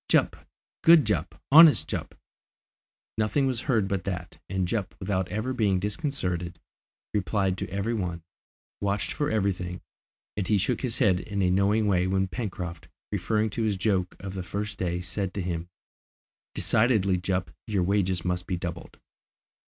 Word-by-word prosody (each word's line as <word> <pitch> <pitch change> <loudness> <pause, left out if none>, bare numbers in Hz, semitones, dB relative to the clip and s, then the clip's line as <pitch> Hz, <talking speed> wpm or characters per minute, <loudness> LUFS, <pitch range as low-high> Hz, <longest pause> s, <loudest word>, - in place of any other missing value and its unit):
"Jup! - - +2 0.4
Good 165 -4 +7
Jup! 90 -5 -1
Honest 160 +1 +8
Jup!" - - -4 1.0
Nothing 110 +6 +2
was 130 -3 0
heard 110 -6 +3
but 95 -2 -2
that, 90 -2 -5
and 95 -1 0
Jup 100 -1 -2
without 95 -1 -1
ever 110 +7 -2
being 105 -7 +2
disconcerted, 90 - -3 0.5
replied 100 -2 +1
to - - -4
every 100 +5 -1
one, 90 -6 -3 0.6
watched 100 0 0
for 145 - -1
everything, 90 -4 -1 0.6
and 100 -2 -2
he 105 - +3
shook 100 - 0
his 125 -4 -1
head 100 -8 +3
in 100 0 -2
a 90 - +3
knowing 100 +3 +3
way 95 -3 +2
when 95 0 +1
Pencroft, 90 -3 -5 0.2
referring 105 +3 0
to 115 - -3
his 105 -3 +1
joke 95 -2 0
of 95 -1 -6
the 95 - -4
first 100 +3 -4
day, 90 -1 -1
said 90 +1 -3
to 100 - -1
him, 85 -1 -3 0.9
"Decidedly, 110 -5 +3
Jup, 90 0 -2 0.2
your 100 -4 +1
wages 95 -2 +1
must 90 0 -1
be 90 - -1
doubled." 85 -1 -6
95 Hz, 160 wpm, -27 LUFS, 90-105 Hz, 1.0 s, Honest